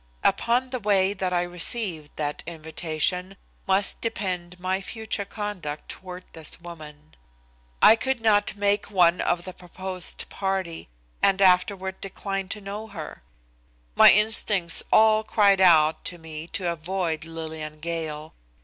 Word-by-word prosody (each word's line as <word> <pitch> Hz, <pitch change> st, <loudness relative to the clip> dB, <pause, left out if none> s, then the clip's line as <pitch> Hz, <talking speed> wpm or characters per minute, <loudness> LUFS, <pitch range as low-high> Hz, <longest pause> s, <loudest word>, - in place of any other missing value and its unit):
Upon 250 Hz, +2 st, +1 dB
the 255 Hz, -, -2 dB
way 200 Hz, -2 st, +3 dB
that 190 Hz, -2 st, -2 dB
I 175 Hz, -1 st, +1 dB
received 175 Hz, -3 st, -5 dB
that 150 Hz, -1 st, -3 dB
invitation 165 Hz, +3 st, -2 dB, 0.3 s
must 195 Hz, +1 st, +1 dB
depend 180 Hz, -5 st, -3 dB
my 185 Hz, +1 st, -1 dB
future 220 Hz, -1 st, -3 dB
conduct 195 Hz, -8 st, -6 dB
toward 180 Hz, -1 st, -8 dB
this 160 Hz, -2 st, -4 dB
woman. 155 Hz, -3 st, -12 dB, 0.7 s
I 220 Hz, -, +9 dB
could 265 Hz, +2 st, -1 dB
not 215 Hz, -3 st, +2 dB
make 205 Hz, 0 st, +1 dB
one 180 Hz, -3 st, +3 dB
of 175 Hz, 0 st, 0 dB
the 185 Hz, -, -7 dB
proposed 185 Hz, 0 st, -7 dB
party 190 Hz, -, -3 dB, 0.3 s
and 195 Hz, -1 st, +3 dB
afterward 190 Hz, 0 st, +2 dB
decline 195 Hz, 0 st, -4 dB
to 210 Hz, -, -4 dB
know 205 Hz, +2 st, -6 dB
her. 165 Hz, -, -9 dB, 0.7 s
My -, -, +8 dB
instincts 210 Hz, -4 st, +4 dB
all 220 Hz, 0 st, +5 dB
cried 200 Hz, -3 st, +3 dB
out 160 Hz, -4 st, +5 dB
to 175 Hz, -, -3 dB
me 160 Hz, -1 st, -8 dB
to 175 Hz, -1 st, -2 dB
avoid 170 Hz, -1 st, -3 dB
Lillian 160 Hz, -2 st, -7 dB
Gale. 155 Hz, -1 st, -5 dB
185 Hz, 135 wpm, -25 LUFS, 165-200 Hz, 0.7 s, I